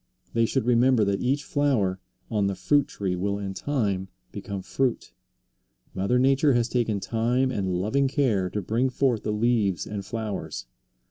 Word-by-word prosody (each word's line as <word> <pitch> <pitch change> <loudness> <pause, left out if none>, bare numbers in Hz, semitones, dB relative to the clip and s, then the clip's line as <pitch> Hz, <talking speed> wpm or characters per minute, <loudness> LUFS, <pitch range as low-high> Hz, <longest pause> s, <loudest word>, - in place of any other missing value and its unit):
They 115 -1 +3
should 130 0 0
remember 120 -1 +4
that 100 0 0
each 135 +4 0
flower 120 -11 +1 0.3
on 105 -3 +1
the 100 - -1
fruit 145 +5 +2
tree 95 -3 -3
will 100 +2 -1
in 100 -1 -4
time 100 -7 -1 0.2
become 100 -1 -6
fruit. 130 +4 -1 0.8
Mother 100 +6 +1
Nature 135 +2 +4
has 120 -1 +2
taken 115 -4 0
time 120 +5 0
and 95 -6 -1
loving 110 +10 +1
care 115 -10 +1
to 105 +2 -3
bring 115 +7 +1
forth 125 -4 +1
the 105 - -2
leaves 105 -4 +1
and 105 -2 -5
flowers. 105 - -5
110 Hz, 160 wpm, -26 LUFS, 100-130 Hz, 0.8 s, remember